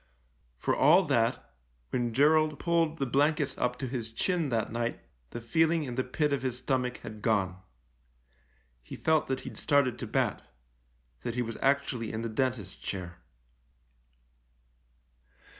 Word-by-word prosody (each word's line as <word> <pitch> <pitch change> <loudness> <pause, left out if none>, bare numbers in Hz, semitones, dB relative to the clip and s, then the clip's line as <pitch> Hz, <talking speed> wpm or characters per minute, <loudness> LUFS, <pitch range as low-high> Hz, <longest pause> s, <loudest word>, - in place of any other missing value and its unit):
For - - 0
all - - +6
that, - - 0 0.4
when 120 -2 0
Gerald 155 +4 +4
pulled 165 -2 +1
the 135 - 0
blankets 140 +1 +1
up 125 0 0
to 130 - -3
his 120 -3 -4
chin 165 +6 0
that 115 -3 -1
night 120 +1 -2 0.3
the - - -6
feeling 160 +7 +2
in 125 -4 -5
the 130 +1 0
pit 145 +3 0
of 140 - 0
his 130 -2 -2
stomach 125 -1 -1
had 110 -1 -8
gone. 95 -4 0 1.2
He - - -9
felt 160 -1 +2
that 130 0 -2
he'd - - -8
started 140 -5 +2
to 120 - -4
bat - - 0 0.4
— - - -40
that 120 - -4
he 125 - +1
was 115 -1 -5
actually 135 -4 +1
in 110 +1 -4
the 115 - -2
dentist's 110 -4 -1
chair. 90 -2 -6
125 Hz, 155 wpm, -29 LUFS, 115-145 Hz, 1.2 s, all